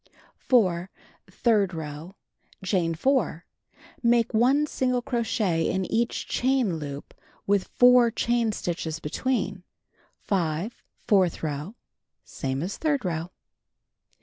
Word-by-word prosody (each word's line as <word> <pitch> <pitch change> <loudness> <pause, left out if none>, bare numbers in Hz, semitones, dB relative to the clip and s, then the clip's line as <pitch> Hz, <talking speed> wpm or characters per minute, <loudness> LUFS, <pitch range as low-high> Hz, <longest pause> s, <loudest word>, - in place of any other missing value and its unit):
4. 185 -7 +3 0.4
Third 205 -6 +1
row: 160 +4 -7 0.5
Chain 175 -4 +1
4. 205 - 0 0.6
Make 235 -1 +2
1 260 +7 +4
single 250 -4 -1
crochet 225 -9 0
in 190 0 -1
each 230 +1 0
chain 250 -9 +1
loop 145 -2 -7 0.3
with 200 -1 +1
4 245 -1 +6
chain 235 0 0
stitches 165 -5 -3
between. 245 - -2 0.6
5. 180 +2 -2 0.2
Fourth 185 -6 +2
row: 150 +7 -4 0.5
Same 135 +2 -3
as 190 +3 -4
third 290 -7 0
row. 165 -1 -2
200 Hz, 105 wpm, -26 LUFS, 165-240 Hz, 0.6 s, 4